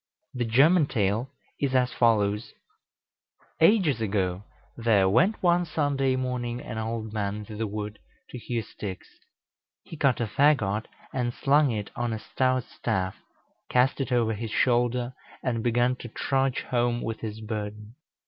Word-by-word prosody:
The 125 Hz, -1 st, -1 dB
German 145 Hz, +8 st, +5 dB
tale 110 Hz, +2 st, 0 dB, 0.3 s
is 135 Hz, -2 st, 0 dB
as 125 Hz, -1 st, +2 dB
follows: 105 Hz, -2 st, +2 dB, 1.1 s
Ages 165 Hz, -, +4 dB
ago 95 Hz, -3 st, 0 dB, 0.3 s
there 110 Hz, -5 st, +3 dB
went 175 Hz, -, +2 dB
one 175 Hz, 0 st, +4 dB
Sunday 145 Hz, -5 st, 0 dB
morning 125 Hz, -2 st, -2 dB
an 110 Hz, -2 st, -6 dB
old 110 Hz, -1 st, -4 dB
man 100 Hz, -2 st, -1 dB
into 105 Hz, 0 st, -8 dB
the 110 Hz, +1 st, -2 dB
wood 105 Hz, 0 st, -5 dB, 0.3 s
to 125 Hz, -, -6 dB
hew 115 Hz, -1 st, -3 dB
sticks. 100 Hz, -2 st, -7 dB, 0.8 s
He -, -, -10 dB
cut 140 Hz, -4 st, +2 dB
a 120 Hz, -, +1 dB
fagot 110 Hz, -3 st, +2 dB, 0.3 s
and 125 Hz, -2 st, 0 dB
slung 145 Hz, +1 st, +3 dB
it 105 Hz, -4 st, -3 dB
on 120 Hz, -1 st, -1 dB
a -, -, -2 dB
stout 130 Hz, +2 st, 0 dB
staff, 95 Hz, -7 st, -2 dB, 0.5 s
cast 130 Hz, +3 st, +2 dB
it 130 Hz, -, -3 dB
over 115 Hz, -2 st, +2 dB
his 110 Hz, +1 st, -4 dB
shoulder, 120 Hz, +1 st, +1 dB, 0.3 s
and 120 Hz, -3 st, -1 dB
began 120 Hz, +2 st, +2 dB
to 120 Hz, -, -8 dB
trudge 135 Hz, +3 st, 0 dB
home 120 Hz, -1 st, 0 dB
with 115 Hz, 0 st, -3 dB
his 110 Hz, -1 st, -5 dB
burden. 105 Hz, 0 st, -5 dB
120 Hz, 150 wpm, -27 LUFS, 110-130 Hz, 1.1 s, German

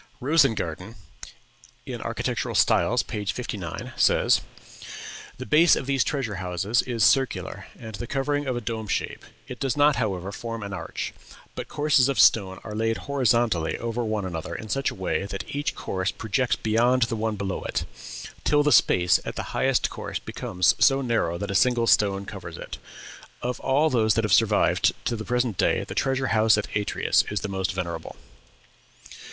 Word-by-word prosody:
Rosengarten 115 Hz, -, +1 dB, 0.9 s
("Architectural -, -, -3 dB
Styles," -, -, +3 dB
p. 105 Hz, -, -5 dB
59) 100 Hz, +2 st, -5 dB
says: -, -, +3 dB, 1.0 s
"The 130 Hz, -, -6 dB
base 160 Hz, +4 st, +5 dB
of -, -, -4 dB
these 135 Hz, -1 st, +2 dB
treasure 125 Hz, -9 st, -2 dB
houses 95 Hz, +6 st, 0 dB
is 120 Hz, -3 st, -1 dB
circular, 135 Hz, -1 st, +1 dB
and 110 Hz, -1 st, -9 dB
the 120 Hz, +4 st, -6 dB
covering 145 Hz, +2 st, -1 dB
of 130 Hz, -, -1 dB
a -, -, -3 dB
dome 110 Hz, -1 st, -4 dB
shape; -, -, -3 dB, 0.2 s
it 125 Hz, -, -8 dB
does 135 Hz, -1 st, -1 dB
not, 145 Hz, -2 st, +4 dB
however, 100 Hz, -5 st, -2 dB
form 115 Hz, +1 st, -6 dB
an 100 Hz, 0 st, -6 dB
arch, -, -, -5 dB, 0.4 s
but -, -, -6 dB
courses 145 Hz, -3 st, +3 dB
of 140 Hz, -, -1 dB
stone 95 Hz, -4 st, +4 dB
are 105 Hz, -, -7 dB
laid 115 Hz, +1 st, 0 dB
horizontally 120 Hz, -, +1 dB
over 115 Hz, +1 st, -3 dB
one 110 Hz, -3 st, -2 dB
another 85 Hz, -2 st, -5 dB
in 110 Hz, -, -7 dB
such 135 Hz, +4 st, 0 dB
a -, -, -8 dB
way 95 Hz, +1 st, -2 dB
that 100 Hz, -1 st, -5 dB
each 145 Hz, +2 st, -2 dB
course 95 Hz, 0 st, -2 dB
projects 120 Hz, +3 st, 0 dB
beyond 120 Hz, +3 st, +2 dB
the 115 Hz, -, -1 dB
one 110 Hz, 0 st, -1 dB
below 100 Hz, -2 st, -3 dB
it, -, -, -3 dB, 0.6 s
till 145 Hz, 0 st, +3 dB
the 150 Hz, -, +2 dB
space 90 Hz, -8 st, +4 dB
at -, -, -6 dB
the -, -, -3 dB
highest -, -, +1 dB
course -, -, -5 dB
becomes 90 Hz, -1 st, 0 dB
so 135 Hz, -1 st, +4 dB
narrow 115 Hz, -9 st, 0 dB
that 100 Hz, +2 st, -4 dB
a -, -, -2 dB
single 120 Hz, +5 st, +3 dB
stone 100 Hz, -3 st, +3 dB
covers -, -, -8 dB
it. -, -, -8 dB, 0.6 s
Of 125 Hz, 0 st, -2 dB
all 145 Hz, +4 st, +2 dB
those 110 Hz, -3 st, +3 dB
that 115 Hz, -, +1 dB
have 105 Hz, -, +1 dB
survived -, -, +3 dB
to 120 Hz, -, 0 dB
the 110 Hz, -, -5 dB
present 125 Hz, -5 st, -1 dB
day -, -, +2 dB
the -, -, -7 dB
treasure 135 Hz, -1 st, 0 dB
house 110 Hz, -1 st, +4 dB
at 105 Hz, -, -4 dB
Atreus 105 Hz, 0 st, +2 dB
is 105 Hz, -2 st, -2 dB
the 105 Hz, -, -4 dB
most 95 Hz, 0 st, -1 dB
venerable." 85 Hz, -3 st, -5 dB
115 Hz, 175 wpm, -25 LUFS, 100-130 Hz, 1.0 s, base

